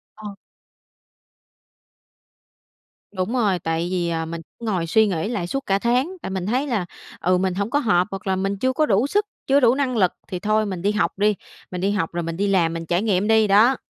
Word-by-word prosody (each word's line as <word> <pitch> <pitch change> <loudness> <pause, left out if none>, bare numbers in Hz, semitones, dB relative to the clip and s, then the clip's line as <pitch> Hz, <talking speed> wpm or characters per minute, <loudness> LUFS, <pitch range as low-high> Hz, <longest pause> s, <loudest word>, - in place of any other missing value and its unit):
Ờ. 210 -2 -9 2.8
Đúng 185 +3 -3
rồi, 210 -8 +1
tại 165 +1 -2
vì, 175 -2 -1
à, 165 -1 -2
mình 165 +1 -6 0.2
ngồi 190 -8 -2
suy 220 +6 +4
nghĩ 180 0 -2
lại 200 -8 -2
suốt 275 +8 -3
cả 195 0 +1
tháng, 255 - 0
tại - - -5
mình 190 -2 -3
thấy 255 +8 0
là, 220 -9 -1 0.3
ừ, 180 +1 +2
mình 185 0 0
hổng 200 +3 -2
có 285 - +1
hợp, 190 -8 +2
hoặc 195 0 -7
là 190 - +2
mình 195 +1 -2
chưa 260 +5 0
có 305 +4 +2
đủ 220 +1 +2
sức, 415 +7 +1 0.2
chưa 275 +1 +5
đủ 245 -2 +4
năng 265 -3 -1
lực 185 -4 +3 0.2
thì 185 -3 -5
thôi 215 +2 +1
mình 185 -4 -4
đi 205 - +1
học 210 -1 0
đi, 210 +1 +2 0.4
mình 180 -1 -4
đi 195 - +1
học 190 -6 -1
rồi 175 0 -2
mình 165 0 -4
đi 205 - 0
làm, 175 -4 +2
mình 165 0 -5
trải 175 +3 0
nghiệm 205 -2 +1
đi, 220 -1 +4
đó. 220 +6 +5
200 Hz, 225 wpm, -22 LUFS, 180-225 Hz, 2.8 s, chưa